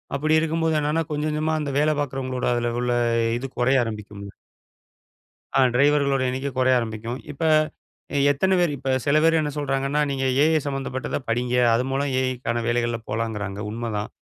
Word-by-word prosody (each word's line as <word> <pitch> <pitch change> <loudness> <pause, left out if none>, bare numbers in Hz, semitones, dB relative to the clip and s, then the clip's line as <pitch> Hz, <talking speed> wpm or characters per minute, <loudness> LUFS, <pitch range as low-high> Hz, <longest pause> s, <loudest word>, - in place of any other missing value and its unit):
அப்பிடி 155 +3 +2
இருக்கும்போது 160 0 0
என்னென்னா 150 +2 0
கொஞ்சம் 150 +1 -1
கொஞ்சமா 155 +1 0
அந்த 145 -2 -3
வேல 155 +1 +3
பார்க்கிறவங்களோட 130 -2 -3
அதில 120 0 0
உள்ள 125 0 0 0.5
இது 135 - -4
குறைய 130 +1 +3
ஆரம்பிக்கும். 105 -2 -7 1.3
அ - - +6
டிரைவர்களோட 140 0 +3
எண்ணிக்க 130 +2 -3
குறைய 130 0 +4
ஆரம்பிக்கும். 115 +2 -4
இப்ப 145 - -9 0.7
அ - - +1 0.2
எத்தன 190 +7 +1
பேரு 175 -4 +2
இப்ப 135 0 -3 0.2
சில 145 +2 +3
பேரு 165 0 +4
என்ன 150 -1 -2
சொல்கறாங்கன்னா, 135 0 0
நீங்க 135 -1 -1 0.2
ஏஐ 160 0 +4
சம்மந்தப்பட்டத 135 -2 -3
படிங்க. 120 +2 -1 0.2
அது 120 - +2
மூலம் 140 0 -1
ஏஐக்கான 120 -2 -2
வேலைகள்ல 120 -1 0
போலங்குறாங்க 105 -2 -3
உண்மதான். 110 -2 -3
135 Hz, 155 wpm, -23 LUFS, 120-150 Hz, 1.3 s, அ